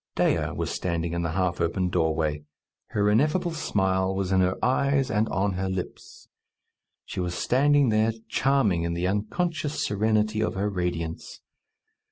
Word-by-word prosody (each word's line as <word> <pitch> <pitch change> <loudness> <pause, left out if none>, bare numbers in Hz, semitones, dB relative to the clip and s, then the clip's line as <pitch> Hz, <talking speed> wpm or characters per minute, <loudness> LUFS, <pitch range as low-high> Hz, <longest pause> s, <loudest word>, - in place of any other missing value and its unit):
Dea - - +1
was - - -2
standing 85 -1 -2
in 85 - -1
the 85 -1 -2
half 90 -1 0
open 90 +2 0
doorway. 80 -3 0 0.4
Her 105 0 0
ineffable 150 - +2
smile 95 -10 0
was 95 -1 -2
in 95 -1 +4
her 90 0 +1
eyes 135 0 +1
and 110 +1 +1
on 100 +1 0
her 95 +1 -2
lips. 95 -1 -6 0.8
She - - -6
was 90 -1 -2
standing 140 +5 +3
there, 110 +1 +3 0.2
charming 115 -9 +2
in 85 0 -2
the 85 +1 -1
unconscious 150 - -1
serenity 110 +1 +1
of 110 - -1
her 100 +2 -1
radiance. 85 -3 -4
95 Hz, 155 wpm, -26 LUFS, 90-110 Hz, 0.8 s, in